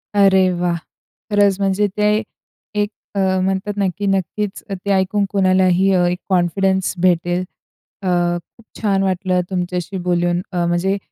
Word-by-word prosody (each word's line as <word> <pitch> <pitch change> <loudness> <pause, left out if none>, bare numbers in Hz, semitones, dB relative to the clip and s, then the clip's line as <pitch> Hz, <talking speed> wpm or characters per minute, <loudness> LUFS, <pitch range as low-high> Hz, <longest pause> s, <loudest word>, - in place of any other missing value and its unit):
अरे 190 -2 +5
वाह! 175 -1 +1 0.6
खरंच 205 -1 +3
म्हणजे 195 +1 +1
ते 210 - +2 0.7
एक 205 0 +1 0.3
अ, - - 0 0.2
म्हणतात 195 +2 -1
ना, 200 - +1
की 205 - -3
नक्कीच 195 +2 -2
ते 195 +1 -3
ऐकून 195 +2 +1
कोणालाही 185 -1 +3
अ, 180 -1 +3
एक 180 - -2
कॉन्फिडन्स 190 +1 +1
भेटेल. 175 0 +2 0.6
अ, 190 - -4 0.5
खूप 230 - -19 0.2
छान 195 -3 +2
वाटलं 185 -1 0
तुमच्याशी 180 0 -3
बोलून 175 0 +1
अ, 175 -2 0
म्हणजे 175 +3 +1
190 Hz, 140 wpm, -19 LUFS, 180-200 Hz, 0.7 s, अरे